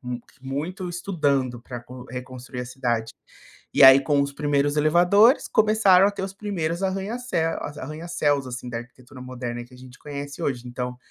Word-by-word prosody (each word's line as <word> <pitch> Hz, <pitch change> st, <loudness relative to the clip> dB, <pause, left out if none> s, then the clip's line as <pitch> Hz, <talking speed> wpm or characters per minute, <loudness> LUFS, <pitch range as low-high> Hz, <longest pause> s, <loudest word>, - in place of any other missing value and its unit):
mu 125 Hz, -1 st, -5 dB, 0.2 s
muito 155 Hz, +8 st, -4 dB
estudando 145 Hz, -9 st, -1 dB
pra 120 Hz, 0 st, -8 dB
con 125 Hz, +1 st, -11 dB
reconstruir 125 Hz, 0 st, -7 dB
a 125 Hz, -, -5 dB
cidade. 120 Hz, -3 st, -2 dB, 0.6 s
E -, -, +5 dB
aí, 135 Hz, +1 st, +10 dB
com 145 Hz, 0 st, +1 dB
os 140 Hz, 0 st, -3 dB
primeiros 145 Hz, 0 st, 0 dB
elevadores, 175 Hz, -, +4 dB
começaram 210 Hz, -4 st, +5 dB
a -, -, +2 dB
ter 195 Hz, -, -5 dB
os 190 Hz, 0 st, -4 dB
primeiros 180 Hz, -4 st, -3 dB
arranha-céu 190 Hz, -3 st, -2 dB, 0.2 s
arranha-céus 150 Hz, -2 st, -1 dB
assim, 125 Hz, 0 st, -6 dB
da 115 Hz, -1 st, -4 dB
arquitetura 125 Hz, +2 st, -13 dB
moderna 120 Hz, -2 st, -5 dB
que 125 Hz, +1 st, -18 dB
a -, -, -15 dB
gente 130 Hz, 0 st, -14 dB
conhece 145 Hz, -1 st, -7 dB
hoje, 125 Hz, -3 st, -2 dB
então 125 Hz, 0 st, -4 dB
140 Hz, 170 wpm, -24 LUFS, 125-175 Hz, 0.6 s, aí